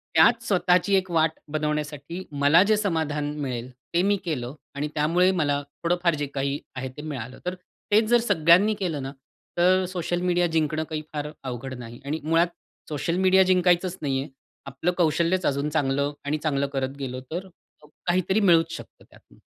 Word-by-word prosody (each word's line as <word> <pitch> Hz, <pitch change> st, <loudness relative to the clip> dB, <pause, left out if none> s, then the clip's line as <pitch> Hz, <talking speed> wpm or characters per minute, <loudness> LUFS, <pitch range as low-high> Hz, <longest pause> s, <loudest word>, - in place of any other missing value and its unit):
त्यात 235 Hz, 0 st, +5 dB
स्वतःची 185 Hz, -1 st, +2 dB
एक 190 Hz, -1 st, +1 dB
वाट 160 Hz, -1 st, +3 dB, 0.2 s
बनवण्यासाठी 150 Hz, +2 st, -3 dB
मला 145 Hz, +4 st, +5 dB
जे 215 Hz, +1 st, +3 dB
समाधान 160 Hz, -7 st, -1 dB
मिळेल, 125 Hz, -3 st, -4 dB, 0.2 s
ते 170 Hz, -, +3 dB
मी 205 Hz, +1 st, +3 dB
केलं 130 Hz, -6 st, -3 dB, 0.2 s
आणि 145 Hz, +2 st, -2 dB
त्यामुळे 170 Hz, +5 st, +3 dB
मला 145 Hz, -6 st, 0 dB, 0.2 s
थोडंफार 175 Hz, -1 st, +2 dB
जे 145 Hz, -1 st, -2 dB
काही 140 Hz, +1 st, -1 dB, 0.2 s
आहे 130 Hz, 0 st, -4 dB
ते -, -, -6 dB
मिळालं. 130 Hz, -5 st, -6 dB
तर 180 Hz, +1 st, -2 dB, 0.4 s
तेच 215 Hz, +2 st, +5 dB
जर 240 Hz, -, +6 dB
सगळ्यांनी 200 Hz, 0 st, +4 dB
केलं 165 Hz, -8 st, -2 dB
ना 135 Hz, -, -5 dB, 0.5 s
तर 185 Hz, +2 st, +4 dB
सोशल 175 Hz, -1 st, -2 dB
मीडिया 175 Hz, -1 st, +2 dB
जिंकणं 160 Hz, -1 st, 0 dB
काही 155 Hz, -1 st, -3 dB
फार 150 Hz, 0 st, -3 dB
अवघड 130 Hz, 0 st, -5 dB
नाही 120 Hz, 0 st, -9 dB
आणि 150 Hz, +3 st, -2 dB
मुळात 165 Hz, +2 st, +3 dB, 0.4 s
सोशल 155 Hz, +3 st, -1 dB
मीडिया 190 Hz, 0 st, +5 dB
जिंकायचंच 180 Hz, 0 st, +2 dB
नाही 135 Hz, -3 st, 0 dB
आहे. 140 Hz, -, -7 dB, 0.4 s
आपलं 140 Hz, +6 st, -1 dB
कौशल्यच 170 Hz, +2 st, +2 dB
अजून 140 Hz, +1 st, 0 dB
चांगलं 140 Hz, -1 st, 0 dB
आणि 150 Hz, +2 st, 0 dB
चांगलं 140 Hz, -3 st, +1 dB
करत 135 Hz, 0 st, -2 dB
गेलो 130 Hz, -2 st, -4 dB
तर 180 Hz, +4 st, -4 dB, 0.6 s
काहीतरी 185 Hz, +3 st, +2 dB
मिळूच 165 Hz, -5 st, +4 dB
शकतं -, -, -12 dB
त्यातनं. -, -, -21 dB
160 Hz, 170 wpm, -25 LUFS, 145-180 Hz, 0.6 s, जर